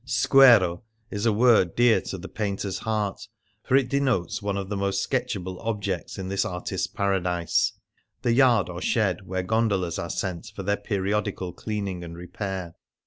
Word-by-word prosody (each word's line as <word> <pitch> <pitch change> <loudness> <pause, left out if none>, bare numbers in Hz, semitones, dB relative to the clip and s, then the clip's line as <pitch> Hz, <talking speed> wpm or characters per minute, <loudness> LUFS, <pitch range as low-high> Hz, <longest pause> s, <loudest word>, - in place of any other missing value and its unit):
Squero 125 -9 +5 0.3
is 105 +3 -1
a - - +4
word 110 -5 +4
dear 120 -1 +4
to 95 - -6
the 95 +1 -8
painter's 100 -2 -3
heart, 105 -3 -2 0.3
for 130 - +1
it 135 -2 +4
denotes 130 -9 0
one 100 -1 -2
of 100 -1 -4
the 105 - -3
most 100 0 0
sketchable 95 -8 -2
objects 100 -5 -3
in 95 -1 -5
this 100 +1 0
artist's 90 -1 -3
paradise 90 -4 0 0.2
— - - -44
the 120 - +2
yard 120 -5 +4
or 90 0 -6
shed 100 -5 0
where 95 0 -2
gondolas 100 -4 0
are 85 - -4
sent 95 +2 -3
for 100 - -5
their 100 +2 +1
periodical 100 -2 -2
cleaning 100 -3 -4
and 85 -1 -8
repair. 90 0 -5
100 Hz, 170 wpm, -25 LUFS, 90-110 Hz, 0.3 s, Squero